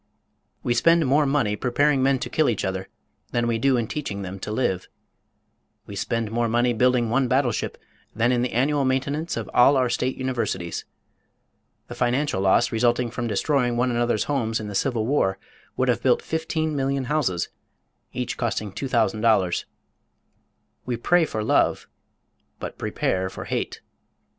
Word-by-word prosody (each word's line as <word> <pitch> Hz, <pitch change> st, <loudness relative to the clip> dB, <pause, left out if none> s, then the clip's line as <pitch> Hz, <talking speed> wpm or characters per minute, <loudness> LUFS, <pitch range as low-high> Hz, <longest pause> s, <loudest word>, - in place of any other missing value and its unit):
We 120 Hz, -, +1 dB
spend 165 Hz, +7 st, +4 dB
more 145 Hz, +2 st, +3 dB
money 135 Hz, -7 st, +1 dB
preparing 135 Hz, +4 st, +2 dB
men 135 Hz, 0 st, +3 dB
to -, -, -3 dB
kill 155 Hz, -4 st, +2 dB
each 110 Hz, -, -1 dB
other 95 Hz, 0 st, -3 dB, 0.4 s
than 120 Hz, 0 st, +1 dB
we 115 Hz, -1 st, 0 dB
do 135 Hz, +1 st, +3 dB
in 115 Hz, -, 0 dB
teaching 105 Hz, -7 st, -4 dB
them 95 Hz, +1 st, -6 dB
to 105 Hz, -, -5 dB
live. 105 Hz, -6 st, -1 dB, 1.0 s
We 100 Hz, -, -9 dB
spend 115 Hz, +2 st, -2 dB
more 120 Hz, +1 st, +1 dB
money 120 Hz, +1 st, +2 dB
building 120 Hz, -1 st, +2 dB
one 130 Hz, +1 st, +2 dB
battleship 130 Hz, -3 st, 0 dB, 0.4 s
than 115 Hz, +3 st, +2 dB
in 120 Hz, -1 st, +2 dB
the 125 Hz, -, -1 dB
annual 140 Hz, +4 st, +1 dB
maintenance 140 Hz, +5 st, -1 dB
of -, -, -4 dB
all 135 Hz, +3 st, +6 dB
our 125 Hz, -2 st, +2 dB
state 125 Hz, +2 st, -1 dB
universities. 120 Hz, -9 st, -2 dB, 1.0 s
The -, -, -7 dB
financial 125 Hz, -4 st, 0 dB
loss 100 Hz, +5 st, +3 dB
resulting 120 Hz, +1 st, +1 dB
from 120 Hz, 0 st, -3 dB
destroying 125 Hz, 0 st, +1 dB
one 125 Hz, +1 st, +1 dB
another's 120 Hz, -2 st, +1 dB
homes 115 Hz, -6 st, -1 dB
in 110 Hz, -, -6 dB
the 105 Hz, -, -6 dB
civil 115 Hz, +2 st, 0 dB
war 110 Hz, -8 st, +1 dB, 0.4 s
would 130 Hz, -, +1 dB
have 120 Hz, -1 st, +1 dB
built 125 Hz, -1 st, +2 dB
15,000,000 155 Hz, -4 st, -1 dB
houses, 120 Hz, -, 0 dB, 0.6 s
each 125 Hz, -1 st, -4 dB
costing 110 Hz, -3 st, -2 dB
$2,000. 110 Hz, -6 st, +1 dB, 1.2 s
We 125 Hz, -2 st, -3 dB
pray 175 Hz, +7 st, +3 dB
for 110 Hz, -7 st, -3 dB
love -, -, +2 dB, 0.7 s
but -, -, -7 dB
prepare 95 Hz, 0 st, -1 dB
for -, -, -8 dB
hate. -, -, -3 dB
120 Hz, 155 wpm, -24 LUFS, 110-135 Hz, 1.2 s, all